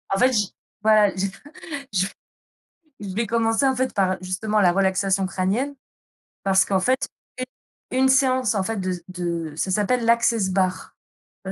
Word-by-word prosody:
En - - -1
fait, 255 +1 +4
j 210 -3 +2 0.4
voilà, 215 -2 +5
je 190 +1 -1 0.7
je 190 -1 +2 0.9
je 195 -2 -6
vais 230 +3 0
commencer 225 +3 +1
en 265 -1 +2
fait, 260 +1 -1
par 190 -2 +2
justement, 200 +4 -1
la 175 -3 +5
relaxation 195 0 +1
crânienne. 200 +10 -1 0.7
Parce 190 -1 +4
qu'en 195 -1 +1
fait, 255 +7 +2 0.9
une 260 +1 +2
une - - +4
séance 260 -4 +3
en 195 - +1
fait, 225 +3 -3
de 185 -1 -1 0.2
de 170 -3 -3
ça 190 - -1
s'appelle 230 +5 +1
l'Access 230 -4 +3
Bars, 185 -1 -1 0.5
je 190 - -3
200 Hz, 160 wpm, -23 LUFS, 185-235 Hz, 0.9 s, voilà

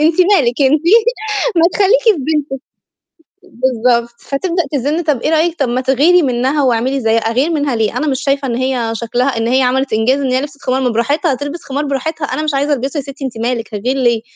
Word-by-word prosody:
أنتِ 325 +3 +3
مالِك 295 -9 +3
أنتِ 290 +3 +3 0.7
ما 330 - +4
تخلّيكِ 415 +5 +3
في 445 - +6
بنتِك، 295 -2 -2 0.8
بالضبط 240 - 0
فتبدأ 340 +5 -2
تزن 290 +5 -1
طَب 295 -7 -1
إيه - - 0
رأيِك 325 +1 +1
طَب 275 - 0
ما 245 +2 -1
تغيري 290 +7 +3
منها 260 +3 0
واعملي 255 +2 0
زي 225 -2 +1
أغير 230 +7 0
منها 290 -6 -1
ليه؟ 220 -1 -1
أنا 305 - -1
مش 265 -3 -1
شايفة 275 -1 0
إن 235 - -2
هي 250 -3 -1
شكلها 245 +3 -1
إن 225 0 -1
هي 260 +2 +2
عملت 260 +1 0
إنجاز 240 +6 +1
إن 265 -2 -1
هي 255 - +2
لبسِت 290 0 -8
خمار، 260 +1 0
ما 260 - +1
براحتها 280 +7 0
تلبِس 290 +5 -6
خمار 280 +2 -3
براحتها، 290 +3 -3
أنا 305 - -3
مش 305 -2 -1
عايزة 285 +2 0
ألبسُه 275 +3 -2
يا - - -2
ستي 275 +1 -9
أنتِ 240 -3 -5
مالِك، 230 -2 -3
هاغير 245 +6 -1
ليه، 235 -4 +1
270 Hz, 215 wpm, -15 LUFS, 245-300 Hz, 0.8 s, في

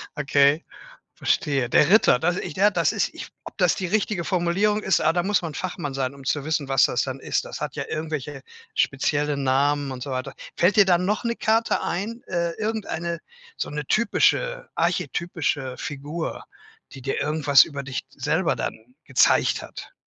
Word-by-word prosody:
okay, 140 +2 +3 0.5
verstehe. 140 -8 0
Der 150 +6 +4
Ritter, 210 - +6
das 175 +5 0
ich, - - -5
ja, 205 +2 +5
das - - +1
ist - - -1
ich - - -8 0.2
ob - - -11
das 180 -3 +3
die 190 - -2
richtige 200 -2 0
Formulierung 195 +4 +1
ist? 190 - +2
Ah, 160 - +3
da 175 - +1
muss 200 0 +1
man 160 -3 -5
Fachmann 170 -6 -4
sein, 135 0 -2
um 135 -1 -13
zu 140 +1 -1
wissen, 155 -2 -1
was 135 -1 +4
das - - +1
dann - - -5
ist. - - -1
Das - - -8
hat - - -4
ja - - -2
irgendwelche 150 -3 -4 0.3
spezielle 145 +2 +1
Namen 140 +1 +1
und 125 - -7
so 140 - -5
weiter. 130 +1 -4 0.2
Fällt 185 +4 +3
dir 205 - +7
da 180 -2 +5
noch 205 +6 -1
'ne 235 0 -1
Karte 225 +1 +1
ein, 220 +7 -3
äh, 170 -1 -1
irgendeine 200 -6 -3 0.4
so - - -3
'ne 150 0 -4
typische - - +1
archetypische 145 -6 -1
Figur, 145 +4 -5 0.5
die 135 - -10
dir 135 +1 -2
irgendwas 150 -2 +5
über 140 -3 -6
dich 130 -1 -4
selber - - 0
dann 115 +3 -6
gezeigt 130 - +3
hat? - - -10
155 Hz, 180 wpm, -24 LUFS, 140-190 Hz, 0.5 s, dir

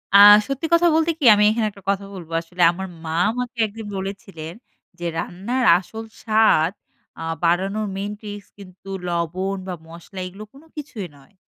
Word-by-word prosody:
আ - - +11 0.3
সত্যি 275 +3 -3
কথা 340 +1 +5
বলতে 325 +1 +3
কি, 290 - -1
আমি 210 - +3
এখানে 220 0 0
একটা 200 -1 -17
কথা 200 0 0
বলব। 175 -4 -9
আসলে 175 +2 -6
আমার 190 +2 -6 0.2
মা 160 0 -3 0.2
আমাকে 250 0 -5
একদিন 220 +1 -9
বলেছিলেন 190 -4 -6 0.5
যে, 175 - -5
‘’রান্নার 230 +11 -2
আসল 220 +5 -8 0.2
স্বাদ 215 -7 +4 0.5
আ - - -7 0.2
বাড়ানোর 195 +5 +1
main 200 +1 -3
tricks 205 -2 -8
কিন্তু 195 -1 -13 0.2
লবণ 175 +3 -2
বা 180 - -3
মশলা, 170 +3 -11
এগুলো 195 +4 -10
কোন 275 - -16
কিছুই 245 -10 -6
নয়।" 140 +9 -22
195 Hz, 165 wpm, -22 LUFS, 180-220 Hz, 0.5 s, আ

